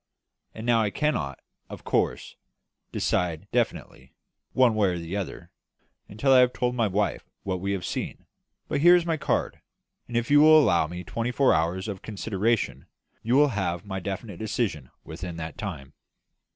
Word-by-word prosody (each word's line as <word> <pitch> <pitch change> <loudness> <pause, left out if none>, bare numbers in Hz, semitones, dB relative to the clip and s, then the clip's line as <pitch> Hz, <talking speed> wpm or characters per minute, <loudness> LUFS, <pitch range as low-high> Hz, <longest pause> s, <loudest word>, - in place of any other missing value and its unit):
And 110 - -7
now 120 -2 +3
I 105 - +1
cannot, 100 - -1 0.3
of - - -9
course, - - -1 0.6
decide 85 -3 -1
definitely, - - -2 0.4
one 125 -3 +4
way 105 -2 +2
or 90 -1 -1
the 85 +2 -5
other, 100 -3 -5 0.6
until 110 +7 0
I 130 - +8
have 125 0 +4
told 125 0 -1
my 115 -3 +1
wife 100 +1 -1
what 95 -2 -3
we 100 +1 -1
have 95 -2 -3
seen; - - -5 0.4
but - - -1
here 175 +2 +8
is 175 -1 +2
my 165 -2 0
card; - - -1 0.5
and 120 - -2
if 120 +4 -1
you 145 - +7
will 155 0 +8
allow 85 - +3
me 90 +2 -7
twenty 115 +5 -3
four 135 +1 +3
hours 85 +4 0
for 100 -3 -5
consideration, 110 +2 -2 0.3
you 120 +3 +1
shall 145 +1 +5
have 95 -5 -2
my 95 -1 -4
definite 100 +1 -5
decision 105 - -2
within 90 -2 -7
that 80 -1 -6
time." 80 -10 -6
105 Hz, 175 wpm, -26 LUFS, 90-125 Hz, 0.6 s, I